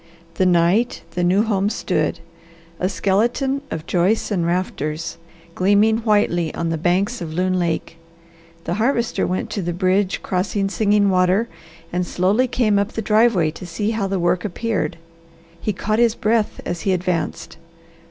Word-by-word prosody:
The 185 - +2
night 180 +7 +2
the 180 - -2
new 185 +4 +3
home 205 -3 +1
stood, 220 - -1 0.6
a 185 - 0
skeleton 235 +9 0
of 160 0 -5
joists 190 +7 +1
and 175 -4 0
rafters, 165 -3 -2 0.3
gleaming 205 +5 +3
whitely 205 -7 +1
on 170 0 -2
the 165 - -1
banks 195 +8 0
of 160 -2 -5
Loon 185 +2 0
Lake, 165 -1 -2 0.7
the 170 - -2
Harvester 235 +3 0
went 185 +4 -2
to 210 - -2
the 175 -1 -2
bridge 185 +2 +1
crossing 195 +2 -1
Singing 205 0 +2
Water 185 +5 +2 0.5
and 180 +1 +1
slowly 195 +8 +1
came 215 -5 +2
up 200 +2 -2
the 225 - -3
driveway 210 -7 +3
to 180 +3 -9
see 205 +6 -2
how 220 -3 -1
the 195 0 -1
work 175 +1 +1
appeared. 210 0 -2 0.6
He 215 - 0
caught 215 +3 -1
his 235 -1 +3
breath 220 0 0
as 175 -1 -3
he 195 - +1
advanced. 175 -3 -2
195 Hz, 160 wpm, -21 LUFS, 175-215 Hz, 0.7 s, new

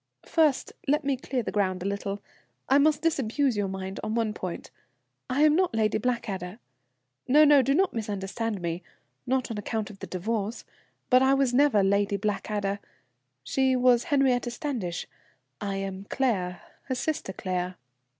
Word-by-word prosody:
First 310 -5 +2
let 300 +2 +2
me 275 -1 +2
clear 255 -1 -3
the - - -3
ground 185 -3 0
a - - -6
little. 200 0 -3 0.4
I 275 - +5
must 305 +1 +3
disabuse 275 -4 +1
your 205 -1 0
mind 190 0 -5
on 215 - -2
one 225 -2 0
point. 185 -5 -6 0.6
I 270 +4 +2
am 305 0 +6
not 360 -8 +1
Lady 215 -1 +2
Blackadder 210 -6 -2 0.7
no, 300 +4 +7
no, 290 -2 +7
do 275 +2 +2
not 380 +3 +2
misunderstand 210 -1 -3
me 170 +1 -2 0.5
not 255 -1 0
on 215 - -3
account 215 0 -3
of 195 - -14
the - - -7
divorce, 210 +4 -3 0.5
but 255 +1 +7
I 265 +1 +5
never 275 -1 +3
was - - +3
Lady 200 +1 +2
Blackadder. 205 0 -2 0.6
She 265 - +2
was 250 -1 +4
Henriette 265 -6 +2
Standish. 235 - -3 0.6
I 200 -1 -2
am 195 0 -4
Claire, 185 -9 0 0.2
her 260 - -2
sister 295 -6 -2
Claire." 185 -1 -3
225 Hz, 160 wpm, -27 LUFS, 195-270 Hz, 0.7 s, no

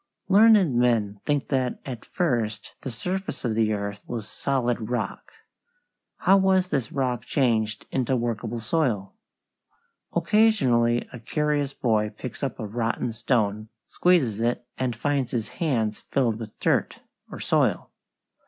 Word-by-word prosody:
Learned 205 - +6
men 115 -4 +1
think 145 -2 0
that 130 -3 0
at 125 -4 -6
first 120 - -1
the 135 - -5
surface 180 - -4
of 115 - +1
the 110 0 +2
earth 100 0 -4
was 115 -3 -5
solid 120 -4 -1
rock. 125 0 -3 0.9
How 195 +1 +5
was 190 -1 +3
this 130 -8 -1
rock 125 -4 -1
changed 110 -6 0
into 130 0 +1
workable 120 -1 -2
soil? 115 - 0 1.0
Occasionally 125 - +3
a 125 - -7
curious 145 +3 -1
boy 110 -3 +1
picks 125 - -7
up 135 -3 -2
a 110 - -3
rotten 115 +2 -2
stone, 110 -2 0 0.2
squeezes 135 - +2
it, 120 +1 0
and 125 -3 -2
finds 140 +1 0
his 115 -4 -2
hands 115 - -1
filled 115 -5 +1
with 110 -2 -9
dirt, - - 0 0.3
or - - -7
soil. - - +1
120 Hz, 135 wpm, -25 LUFS, 110-140 Hz, 1.0 s, Learned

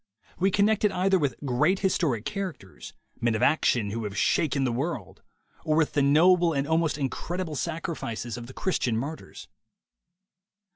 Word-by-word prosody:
We 190 +2 +3
connect 205 +2 +2
it 210 - +4
either 190 +1 +2
with 140 -6 0
great 150 +9 +1
historic 160 - 0
characters, 180 - -6 0.3
men 115 -1 +1
of 110 - -1
action 120 -8 +2
who 115 +2 -3
have 100 -1 -5
shaken 140 -3 +1
the 125 - +1
world, 125 - -4 0.4
or 155 - +1
with 160 -1 +2
the 145 - +2
noble 170 +4 +4
and 140 0 -1
almost 160 -2 +1
incredible 160 +4 -3
sacrifices 155 -8 -4
of 120 -1 -8
the 130 - -11
Christian 125 -11 -1
martyrs. 145 +7 -6
150 Hz, 155 wpm, -26 LUFS, 125-175 Hz, 0.4 s, it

